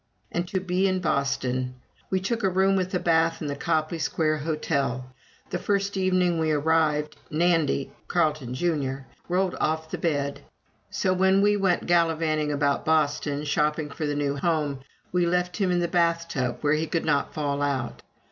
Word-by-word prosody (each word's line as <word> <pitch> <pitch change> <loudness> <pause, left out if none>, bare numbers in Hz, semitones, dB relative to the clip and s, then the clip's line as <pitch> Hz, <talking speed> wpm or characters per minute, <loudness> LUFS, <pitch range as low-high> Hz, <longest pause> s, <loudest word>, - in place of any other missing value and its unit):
And 175 +1 -2
to 190 - -1
be 185 +1 +1
in 185 -1 +1
Boston! 130 -5 -1 0.3
We 190 - +1
took 225 +5 -2
a 195 - +2
room 190 +1 +3
with 185 -1 0
a - - +2
bath 165 -1 +2
in 150 - -4
the 145 - -2
Copley 160 +2 -1
Square 155 -1 0
Hotel. 145 -4 -1 0.5
The 180 - -1
first 200 +1 0
evening 185 -3 +2
we 160 -1 +1
arrived, 150 0 +1
Nandy 160 -4 +1 0.2
(Carleton, 155 -7 0
Jr.) 140 -4 -1 0.3
rolled 185 +1 +1
off 160 0 -1
the - - -3
bed; 145 -4 -1 0.5
so 185 - 0
when 190 +1 +3
we 205 0 +4
went 190 -3 +1
gallivanting 160 -3 +2
about 140 -1 +1
Boston, 150 -2 +1
shopping 150 +1 0
for 150 +1 -3
the 145 - -1
new 145 -1 0
home, 150 -2 0 0.3
we 175 -1 +2
left 180 +1 0
him 195 -3 +1
in 175 -1 +2
the 170 - +1
bath 170 -1 +1
tub 125 -6 -2
where 145 0 +2
he 155 +1 0
could 165 - -1
not 145 -3 +1
fall 145 -2 -1
out. 135 -4 -2
160 Hz, 175 wpm, -26 LUFS, 145-180 Hz, 0.5 s, we